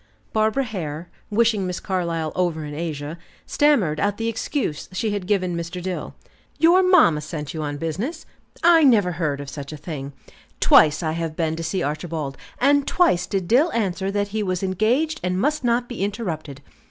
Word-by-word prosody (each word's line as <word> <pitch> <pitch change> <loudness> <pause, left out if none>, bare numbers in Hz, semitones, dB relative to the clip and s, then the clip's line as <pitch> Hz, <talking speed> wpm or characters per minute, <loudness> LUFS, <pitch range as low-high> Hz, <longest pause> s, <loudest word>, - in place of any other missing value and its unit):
Barbara 220 +5 +2
Hare, 175 - -5 0.2
wishing 215 -3 +2
Miss 180 0 -3
Carlyle 170 -4 -2
over 170 -4 -1
in 150 - -7
Asia, 155 0 -5 0.3
stammered 220 - +2
out 205 +2 0
the 225 - -2
excuse 230 - -3
she 215 +3 -1
had 200 -3 -3
given 185 -4 +1
Mr. 170 +2 -4
Dill. 180 0 -5 0.4
"Your 340 +4 +5
mamma 345 - +5
sent 150 -1 -6
you 160 - -4
on 145 -1 -3
business! 200 - -4 0.4
I 330 -1 +6
never 215 -10 +5
heard 155 -5 -2
of 145 - -7
such 140 +1 -7
a 155 - -7
thing. 145 -2 -6 0.5
Twice 155 +3 +5
I 160 - 0
have 165 -1 -3
been 160 -1 -1
to 165 - -5
see 170 +2 -1
Archibald, 150 -2 -3 0.2
and 285 +1 +3
twice 185 - +2
did 190 -3 -2
Dill 280 - +4
answer 195 -3 -1
that 205 0 -1
he 215 +1 -2
was 185 -2 -2
engaged 235 - +1
and 180 0 0
must 295 +5 0
not 240 0 +1
be 240 -5 -4
interrupted. 165 - -4
185 Hz, 180 wpm, -23 LUFS, 160-225 Hz, 0.5 s, I